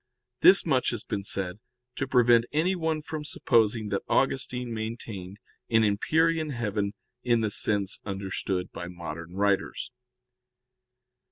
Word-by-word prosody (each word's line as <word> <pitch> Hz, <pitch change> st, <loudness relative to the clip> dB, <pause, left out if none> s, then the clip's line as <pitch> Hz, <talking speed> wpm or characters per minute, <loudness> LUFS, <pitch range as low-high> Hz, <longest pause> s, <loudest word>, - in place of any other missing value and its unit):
This 195 Hz, +8 st, +7 dB
much 135 Hz, -6 st, +2 dB
has 120 Hz, -3 st, -3 dB
been 100 Hz, -1 st, -3 dB
said 95 Hz, -1 st, -1 dB, 0.3 s
to 135 Hz, -, -3 dB
prevent 120 Hz, -2 st, +4 dB
anyone 160 Hz, -1 st, 0 dB
from 155 Hz, -1 st, -5 dB
supposing 110 Hz, -6 st, +1 dB
that 100 Hz, -, -1 dB
Augustine 125 Hz, -2 st, 0 dB
maintained 110 Hz, -4 st, -6 dB, 0.3 s
an 115 Hz, -1 st, +4 dB
empyrean 160 Hz, +10 st, +2 dB
heaven 105 Hz, -5 st, -2 dB, 0.3 s
in 120 Hz, -2 st, +2 dB
the 110 Hz, -2 st, 0 dB
sense 100 Hz, -1 st, 0 dB
understood 95 Hz, -2 st, -3 dB
by 85 Hz, -, -6 dB
modern 85 Hz, 0 st, -8 dB
writers. 100 Hz, +4 st, 0 dB
110 Hz, 120 wpm, -27 LUFS, 100-130 Hz, 0.3 s, This